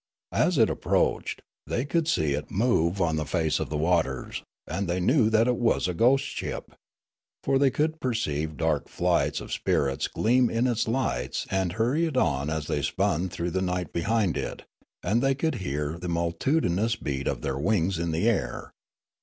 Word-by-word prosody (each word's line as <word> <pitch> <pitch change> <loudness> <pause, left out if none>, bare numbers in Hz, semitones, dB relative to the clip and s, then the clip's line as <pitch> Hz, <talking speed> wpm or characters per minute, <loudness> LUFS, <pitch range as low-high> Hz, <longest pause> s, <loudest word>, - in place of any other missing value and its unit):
As - - +2
it - - +6
approached, - - 0 0.2
the}' 120 - -1
could 165 +2 0
see 80 - +1
it 75 +1 -4
move 100 -5 +1
on 80 -3 +1
the 80 - 0
face 80 0 0
of - - -3
the 75 - -2
waters, 80 -5 0 0.2
and 95 +4 -3
they 90 +1 0
knew 115 - +3
that 110 +1 +3
it 125 -1 +2
was 115 -6 +2
a 90 - -1
ghost 130 +8 +3
ship; - - -5 0.7
for 135 - +2
they 140 -1 +5
could 155 +4 -1
perceive 80 - -2
dark 80 -4 0
flights - - +1
of - - -9
spirits 70 -1 0
gleam 125 +2 +2
in 115 +2 +1
its 120 -3 0
lights 110 - -1
and 95 -2 0
hurry 125 - +1
it 150 -5 -3
on 70 - +1
as 80 -2 -2
they - - -1
spun 90 +4 0
through 85 0 -3
the 95 - -1
night 90 -3 -2
behind 100 0 +1
it, - - -4 0.4
and 115 +4 +1
they 135 0 +2
could 160 +3 0
hear 75 0 -3
the 90 - -5
multitudinous 90 - +1
beat 70 -1 -3
of - - -1
their 70 0 -2
wings 95 0 +1
in 85 0 -1
the 80 +7 0
air. 75 - -1
90 Hz, 185 wpm, -27 LUFS, 80-120 Hz, 0.7 s, it